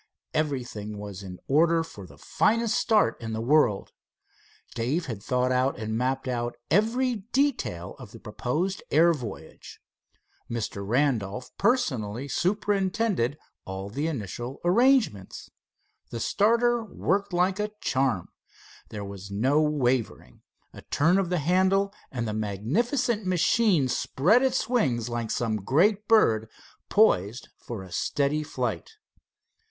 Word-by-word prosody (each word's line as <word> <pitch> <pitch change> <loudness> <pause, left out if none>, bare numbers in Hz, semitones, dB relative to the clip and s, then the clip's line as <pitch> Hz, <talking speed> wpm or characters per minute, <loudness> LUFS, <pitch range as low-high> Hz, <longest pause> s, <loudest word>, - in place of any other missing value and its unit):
Everything 125 -8 -3
was 100 -2 -7
in 95 -2 -8
order 165 +3 +3
for 100 - -11
the - - -16
finest 230 0 +1
start 220 - +2
in 115 -1 -5
the 110 - -3
world. 120 -4 +2 0.8
Dave 135 +9 -1
had 110 -7 -6
thought 125 +3 0
out 130 +2 +1
and 110 0 -3
mapped 130 +3 -1
out 120 -1 -2 0.2
every 230 +6 +2
detail 255 - 0
of - - -10
the - - -12
proposed 180 +10 -2
air 170 +3 +5
voyage. 120 -10 -9 0.7
Mr. 110 -4 -4
Randolph 120 -1 -1
personally 135 - 0
superintended 190 - 0 0.3
all 95 +1 -6
the 145 +7 -2
initial 120 - -5
arrangements. 220 - +2 0.6
The 115 - -5
starter 235 - +2
worked 200 -1 -1
liked 180 +2 +1
a 210 0 -1
charm. 130 -9 0 0.6
There 105 -1 -6
was 100 0 -9
no 130 +10 +2
wavering. 130 -6 -1 0.3
A - - -11
turn 170 +6 +2
of 190 -3 -1
the 180 - +1
handle, 190 +5 +2 0.2
and 120 -3 -3
the 105 - -2
magnificent 195 - -1
machine 180 - +3
spread 175 - +2
its 260 -1 +1
wings 125 - 0
like 120 -1 -3
some 115 -2 -1
great 185 - +2
bird 110 - +4 0.4
poised 120 - +2
for 110 -5 -7
a 95 - -13
steady 140 - 0
flight. 155 - -4
140 Hz, 130 wpm, -26 LUFS, -, 0.8 s, air